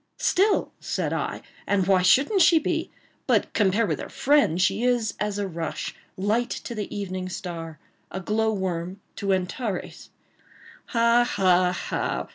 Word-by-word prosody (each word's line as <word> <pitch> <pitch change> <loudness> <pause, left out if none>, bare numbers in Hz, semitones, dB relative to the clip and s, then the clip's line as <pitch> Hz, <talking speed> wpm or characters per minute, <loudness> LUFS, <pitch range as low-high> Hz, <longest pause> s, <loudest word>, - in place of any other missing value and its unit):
"Still!" 420 -4 +2
said - - -2
I, - - -3 0.2
"and 200 -2 +2
why 190 -1 +4
shouldn't 280 - +4
she 335 0 +6
be? 315 - -1 0.4
But - - +2
compared 210 +2 +2
with - - -2
her - - -6
friend 280 - +2
she 190 +4 +2
is 245 -3 +1
as 210 -1 -1
a 205 -1 -1
rush 165 -2 -4 0.2
light 215 +5 0
to 235 - -5
the 210 -3 -4
evening 185 -2 -4
star—a 165 0 -8
glow 220 +3 +1
worm 185 -2 -3 0.2
to 200 -1 -1
Antares." 190 +2 -3 0.8
"Ha! 235 0 +4
ha! 185 -5 +1
200 Hz, 140 wpm, -25 LUFS, 185-235 Hz, 0.8 s, she